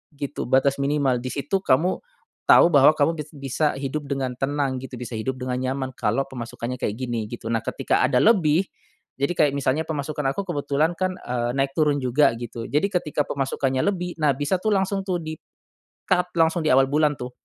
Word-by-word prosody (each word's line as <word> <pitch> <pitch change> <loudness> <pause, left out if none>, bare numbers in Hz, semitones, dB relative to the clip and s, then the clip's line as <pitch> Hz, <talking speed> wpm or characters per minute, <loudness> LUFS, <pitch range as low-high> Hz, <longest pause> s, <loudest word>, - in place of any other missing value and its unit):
gitu, 140 0 -4
batas 135 +2 +3
minimal. 140 -3 +1
Di 130 - -5
situ 145 +7 -1
kamu, 170 +7 +2 0.5
tahu - - +8
bahwa 140 +2 +7
kamu 150 +3 +3
bis 150 0 -6
bisa 140 +1 -1
hidup 140 +2 -4
dengan 135 -2 -2
tenang 135 -1 -1
gitu 130 -1 -8
bisa 120 -1 -7
hidup 130 +4 -3
dengan 125 0 -3
nyaman 130 0 -2
kalo 135 - 0
pemasukannya 120 0 -5
kayak 105 - -1
gini 120 -4 -3
gitu. 120 -1 -8
Nah, 115 -1 0
ketika - - 0
ada - - +2
lebih, 185 -5 +4 0.5
jadi 140 +6 +1
kayak 150 -2 +4
misalnya 140 +3 0
pemasukan 150 -1 -3
aku - - -2
kebetulan 145 +2 0
kan, 185 0 0
eee, 120 -1 -2
naik 135 0 0
turun 150 -2 +3
juga 130 +1 +3
gitu 115 -1 -6
jadi 150 +6 +2
ketika 175 -6 -1
pemasukannya 135 -1 -1
lebih, 180 -3 -2
nah, 145 -2 +4
bisa 145 +6 0
tuh 215 -1 +1
langsung 195 0 0
tuh 185 -2 0
di 155 0 -6 0.7
cut 180 -1 +1
langsung 165 +1 +3
di 155 - +2
awal 135 +1 +5
bulan 150 0 +2
tuh. 125 0 -6
140 Hz, 195 wpm, -23 LUFS, 130-155 Hz, 0.7 s, tahu